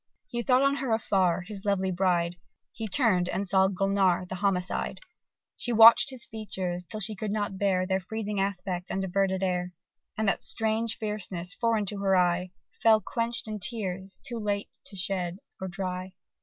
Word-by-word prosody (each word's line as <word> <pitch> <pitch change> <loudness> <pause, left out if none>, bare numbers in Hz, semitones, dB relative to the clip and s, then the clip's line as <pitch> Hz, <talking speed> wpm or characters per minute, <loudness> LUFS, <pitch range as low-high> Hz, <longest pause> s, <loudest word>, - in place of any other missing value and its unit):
He 240 - -3
thought 255 +2 +3
on 275 0 +3
her 265 -4 -2
afar, 190 -5 +2
his 195 +2 -8
lovely 190 -2 +1
bride: 175 -1 +1 0.3
He 220 -1 -5
turned 190 -5 +2
and 200 +1 -2
saw 190 +1 +4
Gulnare, 195 -1 +1
the 180 - -7
homicide! 185 -3 -1 0.6
She 240 - -2
watch'd 230 +3 +8
his 260 -3 -3
features 190 -5 -4
till 215 +5 -7
she 215 +1 +2
could 215 +1 -4
not 205 -2 -2
bear 190 -2 +2
Their 190 0 0
freezing 210 +1 -4
aspect 190 -2 -2
and 195 - -2
averted 190 0 0
air; 180 -1 -1 0.4
And 220 -1 0
that 195 - +2
strange 225 0 0
fierceness, 190 -5 -3
foreign 230 -3 +1
to 200 +1 -3
her 195 -1 +2
eye, 180 0 +2 0.3
Fell 220 -1 +6
quench'd 230 +3 -2
in 215 -1 -4
tears, 190 -3 -3
too 235 -1 -3
late 205 -1 -2 0.2
to 200 - -8
shed 180 -1 -1 0.2
or 190 - -2
dry. 185 0 -4
195 Hz, 175 wpm, -28 LUFS, 185-215 Hz, 0.6 s, watch'd